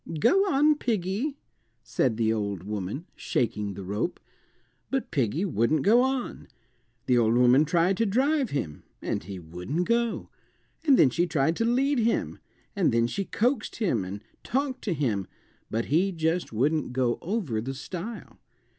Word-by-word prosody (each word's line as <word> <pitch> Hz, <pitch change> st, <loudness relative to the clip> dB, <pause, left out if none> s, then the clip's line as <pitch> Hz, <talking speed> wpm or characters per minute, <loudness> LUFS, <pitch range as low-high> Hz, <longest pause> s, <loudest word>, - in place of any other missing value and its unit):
"Go 155 Hz, -, +4 dB, 0.2 s
on, 295 Hz, +1 st, +4 dB
piggy," 225 Hz, -, -1 dB, 0.5 s
said 120 Hz, -2 st, 0 dB
the 110 Hz, -1 st, +2 dB
old 100 Hz, -4 st, -3 dB
woman, 105 Hz, -, -4 dB
shaking 105 Hz, -4 st, -1 dB
the 100 Hz, -, -7 dB
rope. 105 Hz, -, -2 dB, 0.7 s
But 270 Hz, -4 st, -2 dB
piggy 145 Hz, -, 0 dB
wouldn't 150 Hz, -, +1 dB
go 230 Hz, +4 st, +6 dB
on. 260 Hz, -1 st, -2 dB, 0.6 s
The 125 Hz, -2 st, +3 dB
old 115 Hz, 0 st, +3 dB
woman 125 Hz, +4 st, +5 dB
tried 175 Hz, +4 st, +2 dB
to 230 Hz, -, +2 dB
drive 270 Hz, +5 st, +2 dB
him, 80 Hz, -, -3 dB, 0.2 s
and -, -, -3 dB
he 95 Hz, +2 st, -7 dB
wouldn't 90 Hz, -, -4 dB
go, 235 Hz, 0 st, 0 dB, 0.6 s
and 275 Hz, -3 st, +7 dB
then 130 Hz, -, +5 dB
she 175 Hz, +7 st, +1 dB
tried 160 Hz, 0 st, +1 dB
to 230 Hz, -, +1 dB
lead 265 Hz, +3 st, +2 dB
him, 230 Hz, 0 st, 0 dB, 0.4 s
and 190 Hz, -8 st, +2 dB
then 115 Hz, 0 st, +3 dB
she 195 Hz, +11 st, -2 dB
coaxed 240 Hz, +3 st, 0 dB
him 175 Hz, -, 0 dB
and 100 Hz, +3 st, -7 dB, 0.2 s
talked 265 Hz, +1 st, -1 dB
to 190 Hz, -6 st, 0 dB
him, 110 Hz, -10 st, -1 dB, 0.4 s
but 115 Hz, +1 st, -1 dB
he 175 Hz, +7 st, +2 dB
just 165 Hz, 0 st, -1 dB
wouldn't 135 Hz, +4 st, 0 dB
go 125 Hz, -2 st, +1 dB
over 170 Hz, -, -2 dB
the 135 Hz, +4 st, -5 dB
stile. 190 Hz, -, -7 dB
160 Hz, 160 wpm, -27 LUFS, -, 0.7 s, and